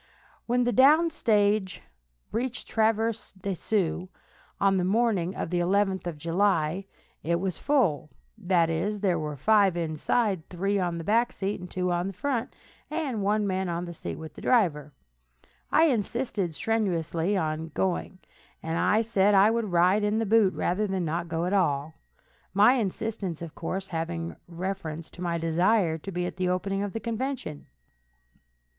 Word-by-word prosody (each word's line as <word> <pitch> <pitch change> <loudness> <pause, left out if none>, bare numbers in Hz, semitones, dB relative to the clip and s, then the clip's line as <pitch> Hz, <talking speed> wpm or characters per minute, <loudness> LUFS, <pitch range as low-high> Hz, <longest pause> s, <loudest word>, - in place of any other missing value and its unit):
When 245 +1 +2
the 245 - +1
down 305 +7 +5
stage 210 - +1 0.5
reached 250 +2 -3
Traverse 225 0 0
des 195 0 -4
Sioux, 185 -1 -1 0.5
on 195 -1 +3
the 180 - +1
morning 195 -3 +1
of 165 - -4
the 175 - +1
11th 190 0 +1
of 165 -3 -4
July, 170 +1 +1 0.4
it 170 +1 0
was 185 -2 -3
full; 200 - +1 0.3
that 180 -5 +2
is, 200 +6 -2
there 180 -5 +2
were 150 -2 -4
five 200 +2 +3
inside, 170 +3 -1
three 195 +3 0
on 175 -2 -1
the 165 - -5
back 230 +6 +2
seat, 195 +1 -3
and 180 - -9
two 180 0 -1
on 175 +1 0
the 195 - -5
front, 250 +4 -2 0.4
and 295 -9 -2
one 210 +1 +1
man 190 -1 -1
on 170 +1 -2
the 175 - -7
seat - - -6
with 160 -1 -9
the - - -11
driver. 155 - +2 0.8
I 320 - +5
insisted 225 - -1
strenuously 185 -3 0
on 160 -1 -2
going, 185 0 -1 0.5
and 190 +7 +1
said 205 -2 +3
I 200 +3 +6
would 230 -1 0
ride 180 +4 +4
in 210 +1 +1
the 225 - 0
boot 210 -2 +4
rather 205 +4 0
than 190 -3 -1
not 170 +2 -2
go 165 +1 -1
at 180 - -1
all, 155 -5 +1 0.6
my 210 +5 +7
insistence, 210 - -2
of 165 - -8
course, 190 +3 -4
having 165 0 -3
reference 170 -2 -5
to 180 - -12
my 170 -1 -1
desire 165 +1 +2
to 195 - -7
be 180 0 -2
at 180 - -5
the 185 -1 0
opening 195 +2 -1
of 205 -1 -3
the 225 - -3
convention. 230 - -4
190 Hz, 165 wpm, -27 LUFS, 170-215 Hz, 0.8 s, my